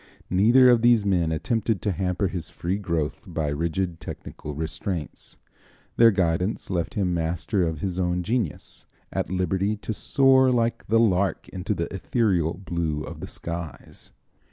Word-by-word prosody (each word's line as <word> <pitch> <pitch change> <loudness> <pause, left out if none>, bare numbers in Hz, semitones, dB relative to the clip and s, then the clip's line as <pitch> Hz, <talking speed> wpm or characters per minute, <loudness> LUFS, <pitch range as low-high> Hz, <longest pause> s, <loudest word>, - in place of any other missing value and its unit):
Neither 120 +7 +6
of 120 -2 +4
these 120 -3 +4
men 90 -5 +2
attempted 110 +6 0
to 105 - +1
hamper 90 +2 -1
his 90 -3 -4
free 95 +4 -3
growth 85 -6 -2
by 75 -2 -2
rigid 85 +3 -2
technical 75 -1 -8
restraints. 80 +1 -4 0.6
Their 115 -1 +7
guidance 95 0 0
left 85 -3 -2
him 95 -4 +1
master 85 +4 -1
of 80 -3 -1
his 95 -2 -2
own 90 0 0
genius, 105 -6 -3 0.3
at - - -1
liberty 95 +3 0
to 110 - -4
"soar 130 +3 +4
like 115 -1 0
the 115 +2 +3
lark 100 -4 +1
into 95 +2 -3
the 85 - -1
ethereal 95 -5 +1
blue 85 -5 -2
of - - -8
the - - -6
skies." 85 -2 -7
95 Hz, 155 wpm, -25 LUFS, 85-105 Hz, 0.6 s, Their